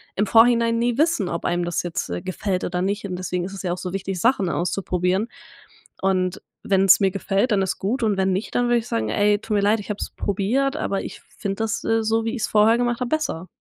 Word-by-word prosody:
im 205 - +1
Vorhinein 230 +1 +4
nie 240 0 0
wissen, 300 - +2
ob 170 - -4
einem 175 0 0
das 175 -1 -1
jetzt, 175 - -3
äh, 90 0 -4
gefällt 185 0 -2
oder 180 0 -2
nicht 200 +2 -1
und 180 -2 -4
deswegen 180 -1 -3
ist 195 - -7
es 195 - -6
ja 180 - -2
auch - - -5
so 180 0 -5
wichtig, 195 -1 -3
Sachen 200 -3 +2
auszuprobieren 180 +3 -1 0.7
und 185 -1 0 0.2
wenn's 195 -1 +5
mir 195 -2 +2
gefällt, 200 +4 0
dann 200 -2 +3
ist 190 - -1
gut 225 +7 -1
und 210 -3 +1
wenn 190 0 +1
nicht, 190 +4 -4
dann 245 - +2
würde 240 0 +3
ich 230 - -8
sagen: 110 -1 -1
„Ey, 205 - +3
tut 220 0 -5
mir 205 - +2
leid, 210 +2 +3
ich 205 - -9
habe 210 - -5
es - - -3
probiert, 235 +8 0
aber 195 - -2
ich - - -8
finde 195 -1 -6
das, 225 +1 -2
äh, 225 0 +1
so 225 +1 +1
wie 225 - -1
ich's 220 - -1
vorher 220 +2 +4
gemacht 240 0 0
hab, 250 - -1
besser.“ 240 - -2
200 Hz, 245 wpm, -23 LUFS, 185-225 Hz, 0.7 s, wenn's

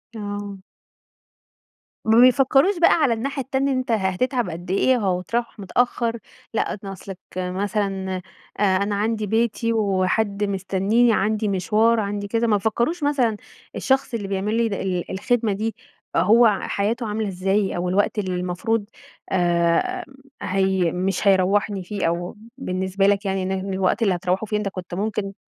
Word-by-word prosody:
آه. 205 -1 -5 1.5
ما 220 +1 +4
بيفكروش 270 +8 +5
بقى 340 - +6
على 285 -8 +3
الناحية 275 +5 -3
التانية 270 +1 0
إن 260 - +1
أنت 255 -1 -2
ه 225 - +4
هتتعب 215 +4 0
قد 175 +2 -6
إيه 250 +6 +3
أو 180 -1 +1
هتروّح 230 +4 -3
متأخر، 235 +3 0 0.4
لأ، 220 - -1
ن - - -7
أصلك 195 0 -8 0.2
مثلًا 190 0 -2 0.4
آآ، - - +2 0.2
أنا 205 0 -1
عندي 215 +1 -1
بيتي 230 +1 0
وحد 200 0 0
مستنيني، 200 +4 +2
عندي 215 +1 0
مشوار، 215 +4 +2
عندي 205 -1 -3
كذا، 230 +2 0
ما 210 -2 +3
فكروش 235 - -1
مثلًا 255 -7 +1 0.4
الشخص 265 -1 0
اللي 205 -4 -3
بيعملي 210 +4 0
د - - -3
ال 185 -3 -3
الخدمة 220 +3 0
دي 220 +2 -3 0.4
هو 215 +4 +5
حياته 225 +4 -1
عاملة 215 0 -2
إزاي 195 +2 0
أو 180 +1 -1
الوقت 205 +3 +1
اللي 185 -3 -2
المفروض 185 +5 -1 0.5
آآ، 175 - +1 0.4
هي 190 -3 +1
مش 190 +2 -1
هيروحني 195 +1 +2
فيه 200 +1 -3
أو 175 +4 -3 0.2
بالنسبة 190 -4 0
لك 205 +1 +2
يعني 190 -1 -1
إن 185 - -2
ه 190 +1 -3
الوقت 190 +4 0
اللي 195 -4 +2
هتروحوا 180 +4 -1
فيه 210 - 0
أنت 210 -1 -2
كنت 185 -2 -8
ممكن 200 +1 -2
205 Hz, 155 wpm, -22 LUFS, 190-230 Hz, 1.5 s, بقى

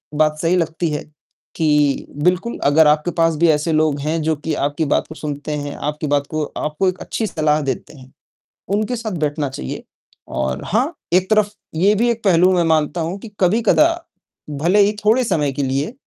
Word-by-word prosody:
बात 155 0 +2
सही 170 +2 +2
लगती 165 -1 -1
है 150 - -3 0.5
कि 150 -3 +2 0.2
बिल्कुल, 180 +6 +1
अगर 150 +2 +5
आपके 150 +3 +2
पास 165 -1 +3
भी 170 - +3
ऐसे 150 +1 +1
लोग 155 -2 +2
हैं 155 +3 -1
जो 160 +1 +1
कि 155 +2 -4
आपकी 145 +3 -1
बात 140 - 0
को 160 - -9
सुनते 145 0 -5
हैं, 145 -1 -5
आपकी 150 +1 -3
बात 145 0 +1
को 155 -1 -2
आपको 155 +5 -1
एक 185 - -6
अच्छी 220 - -3
सलाह 155 -4 +1
देते 140 +2 -4
हैं, 130 0 -15 0.6
उनके 215 +5 -1
साथ 225 -2 -4
बैठना 145 -1 -1
चाहिए। 100 - -6 0.4
और 65 +1 -3
हाँ, 250 - 0 0.2
एक 185 +2 +3
तरफ 215 -1 +3 0.2
ये 195 +6 +4
भी 235 +3 +2
एक 230 -1 -5
पहलू 185 -1 +4
मैं 175 -1 +2
मानता 160 0 +1
हूँ 170 +5 -3
कि 225 - -10
कभी-कदा, 220 - +4 0.7
भले 180 +6 +3
ही 205 +1 +3
थोड़े 235 +4 +4
समय 150 -10 0
के 140 +1 -3
लिए, 135 - -1
160 Hz, 195 wpm, -19 LUFS, 150-190 Hz, 0.7 s, अगर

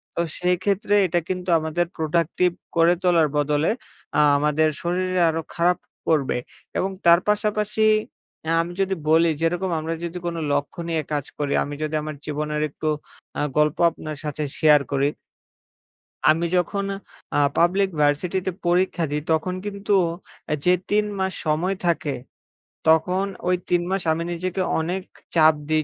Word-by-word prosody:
তো - - +1 0.2
সেইক্ষেত্রে 185 +3 +1
এটা 175 0 +1
কিন্তু 185 -1 -3
আমাদের 160 +2 -1
প্রোডাক্টিভ 170 +3 +1 0.3
করে 170 +1 +5
তোলার 170 -3 +4
বদলে 150 +1 +1 0.5
আ - - +4 0.2
আমাদের 150 +2 +2
শরীরে 185 +1 0
আরো 165 0 -3
খারাপ 175 +1 +3 0.3
করবে। 145 -6 +2 0.4
এবং 195 - 0
তার 170 0 +7
পাশাপাশি 210 0 0 0.7
আ - - +2
আমি 175 +1 -5
যদি 190 0 +1
বলি, 165 +1 +5
যেরকম 175 +3 0
আমরা 160 +1 -3
যদি 170 +1 -4
কোন 170 -1 -2 0.2
লক্ষ্য 145 +3 -1
নিয়ে 165 -1 0
কাজ 145 -2 -1
করি 145 -1 -1
আমি 145 - -6
যদি 155 0 -2
আমার 155 0 -5
জীবনের 150 0 -2
একটু 155 +2 -5 0.5
আ - - +1 0.2
গল্প 150 0 +3
আপনার 155 -2 -7
সাথে 150 0 -3
শেয়ার 150 -2 +6
করি 140 0 +2 1.2
আমি 165 +2 +3
যখন 200 +3 0 0.5
আ - - +3 0.2
পাবলিক 190 +3 +3
ভার্সিটিতে 175 +6 +1 0.2
পরীক্ষা 180 0 +2
দিই, 150 - -1
তখন 160 +3 +1
কিন্তু 205 0 -2 0.6
আ - - +3
যে, 180 - +6 0.2
৩ 210 0 +3
মাস 190 0 0
সময় 165 +5 +1
থাকে। 160 -4 0 0.7
তখন 180 +4 +3 0.2
ওই 180 - +4
৩ 175 -1 +3
মাস 195 0 0
আমি 165 +1 -1
নিজেকে 185 +2 -2 0.2
অনেক 175 +4 -2 0.3
চাপ 160 -1 +7 0.2
দিই 155 0 +2
170 Hz, 150 wpm, -23 LUFS, 155-185 Hz, 1.2 s, তার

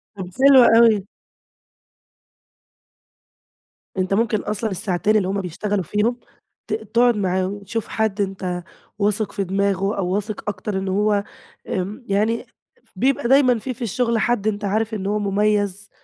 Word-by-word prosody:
طَب 185 -2 -6
حلوة 270 -3 +8
أوي. 220 -4 +5 2.9
أنت 185 +1 0
ممكن 215 0 +1
أصلًا 210 +1 -3
الساعتين 190 +3 0
اللي 185 -3 0
هم 195 +1 -1
بيشتغلوا 190 +2 -2
فيهم 215 +7 0 0.5
ت - - -3
تقعد 230 +2 +2
معاهم، 190 +1 -1
تشوف 220 +2 -4
حد 220 -2 -1
أنت 185 -2 -3 0.4
واثق 210 +1 0
في 200 - -2
دماغه 195 +1 0
أو 185 -2 -1
واثق 210 +2 -3
أكتر 205 -1 -4
إن 190 0 -3
هو 205 +1 +1 0.5
آمم 195 +7 -3
يعني 215 +4 0 0.5
بيبقى 260 -2 +1
دايمًا 255 -3 +4
في 255 +3 -4
في 250 - -19
الشغل، 235 +1 0
حد 220 -1 0
أنت 205 -1 -1
عارف 220 +3 -1
إن 195 -2 -3
هو 210 +1 0
مُميّز 205 0 0
205 Hz, 140 wpm, -21 LUFS, 195-225 Hz, 2.9 s, حلوة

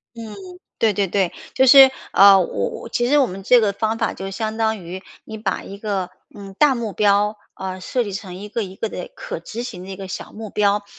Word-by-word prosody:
嗯， 230 -1 -8 0.5
对 225 - +3
对 200 -1 0
对。 190 -1 0 0.2
就 260 - +4
是， 270 0 +9 0.2
啊， 195 -1 +8
我 100 - -1
我 - - -9
其 240 - 0
实 290 +4 +4
我 270 - +3
们 190 +2 -8
这 245 +3 +5
个 205 - +2
方 220 +2 -1
法 225 - -1
就 195 0 -6
相 215 +2 -4
当 220 -3 0
于 185 +3 -8 0.2
你 220 0 -8
把 210 -2 -3
一 200 - -9
个， 200 -3 -3 0.2
呃， 200 -1 -10
大 295 -3 +5
目 230 -4 -4
标， 210 +1 +2 0.2
呃， 190 -1 -6
设 245 +6 -1
计 205 - -6
成 190 -2 -7
一 205 +2 -8
个 230 +1 -2
一 190 -1 -9
个 225 - -3
的 - - -6
可 - - -6
执 230 +2 -7
行 185 -7 -7
的 190 - -10
一 - - -6
个 195 0 -8
小 185 - -7
目 215 -1 -8
标， 205 0 +1
205 Hz, 255 characters per minute, -21 LUFS, 195-225 Hz, 0.5 s, 是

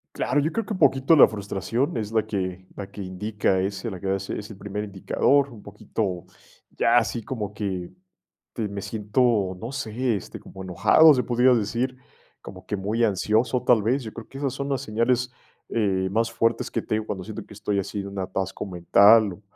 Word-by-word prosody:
Claro, 145 +4 +1
yo 155 +3 0
creo 225 -2 -2
que 215 - -3
poquito 140 -2 +4
la - - +9
frustración, 110 +6 -2
es 110 -1 -3
la 110 -1 +1
que 95 -3 -4
la 100 -2 -7
que 100 - -7
indica 95 0 -1
ese, 100 +3 -3
la 95 - -7
que 100 - -6
va 95 - +2
a - - -4
ser 95 - -5
es 105 +1 -8
el 105 - -9
primer 105 +1 -5
indicador, 135 +8 +1
un 110 -4 -13
poquito, 100 -3 -4 0.5
ya 120 - +2
así 115 0 +1
como 105 -5 -5
que, 95 -4 -4 0.6
te 110 - -3
me 100 0 -5
siento, 105 -2 0
no 115 +3 -5
sé, 120 -1 -1
este, - - -8
como 95 - -10
enojado 155 - +6
se 125 - +1
podría 125 +1 +3
decir, 120 +3 0 0.4
como - - -11
que 105 - -2
muy 110 +5 0
ansioso 110 +5 +1
tal 120 -4 +4
vez. 125 +5 +1
Yo 110 - -7
creo, 115 -2 -10
que 135 - -10
esas 140 -3 -1
son 140 0 -4
las 135 - 0
señales, 120 +3 0 0.4
eh, 95 -4 0
más 115 +3 +1
fuertes 115 0 0
que 115 - -1
te - - -3
digo 110 0 -2
cuando 95 -3 -5
siento 110 -1 -7
que 105 - -14
estoy 105 0 -2
así 100 +1 -3
de 100 - -7
un 100 0 -8
atasco 95 +2 -3
mental, 100 +4 +5
o 100 - -17
105 Hz, 210 wpm, -24 LUFS, 100-120 Hz, 0.6 s, la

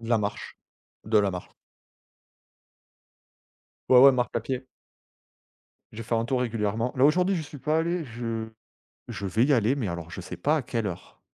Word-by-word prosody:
De 115 - -8
la 115 - +4
marche. 105 0 -4 0.5
De 110 0 +3
la 100 -1 +2
marche. 90 -1 -7 2.4
Ouais, 125 - +8
ouais, 135 +1 +9
marche 125 -1 0
à 120 - +1
pied. 130 +3 -4 1.3
Je 115 +1 -7
fais 115 - -1
un 115 0 +1
tour 125 +1 0
régulièrement 115 +1 -1
là 130 - +4
aujourd'hui 180 +6 +3
j'y 160 - -2
suis 145 -1 -10
pas 155 +4 0
allé, 170 0 -1
je 115 -2 -4 0.6
je 100 - -5
vais 110 +6 +2
y 145 - +3
aller, 120 0 +3
mais 115 -7 -2
alors 85 -1 -6
je - - -8
ne - - -5
sais 90 - -7
pas 150 - +1
à 145 - -1
quelle 115 -3 -3
heure 90 -3 -8
115 Hz, 190 wpm, -26 LUFS, 105-135 Hz, 2.4 s, ouais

